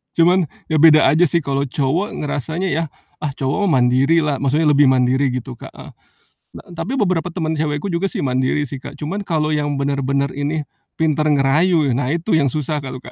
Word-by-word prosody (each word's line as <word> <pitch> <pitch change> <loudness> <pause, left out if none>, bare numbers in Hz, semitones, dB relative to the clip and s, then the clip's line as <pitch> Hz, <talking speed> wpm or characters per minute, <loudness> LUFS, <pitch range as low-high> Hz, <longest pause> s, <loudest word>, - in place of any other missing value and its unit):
Cuman, 175 +1 +3 0.2
ya 155 - +2
beda 155 0 +7
aja 165 +4 +4
sih, 170 +3 0
kalo 140 0 -1
cowok 145 - -1
ngerasanya 155 +6 -3
ya, 165 +3 0 0.4
"Ah, 145 -2 -3
cowok 140 +10 -1
mah 135 -7 +3
mandiri 135 +7 +3
lah," 145 -2 -1
maksudnya 150 +3 +1
lebih 145 -1 +5
mandiri 130 +1 +2
gitu, 125 0 -6
Kak, - - -11
heeh. - - -12 0.6
Na - - -12
tapi 220 +11 -3
beberapa 180 -4 0
temen 160 -2 -2
cewekku 150 +2 -2
juga 170 +3 0
sih - - -4
mandiri 130 +3 0
sih, 135 - -7
Kak, 145 +2 -10
cuman 190 +7 -4
kalo 155 -4 -1
yang 145 -1 -1
bener-bener 140 0 -1
ini, 150 +2 -2 0.4
pinter 155 -1 +1
ngerayu, 150 +3 +2
e - - +1
nah, 130 0 -1
itu 170 +3 0
yang 140 -4 +1
susah 150 +1 -2
kalo 130 -1 -6
Kak. 125 - -12
150 Hz, 200 wpm, -19 LUFS, 140-165 Hz, 0.6 s, beda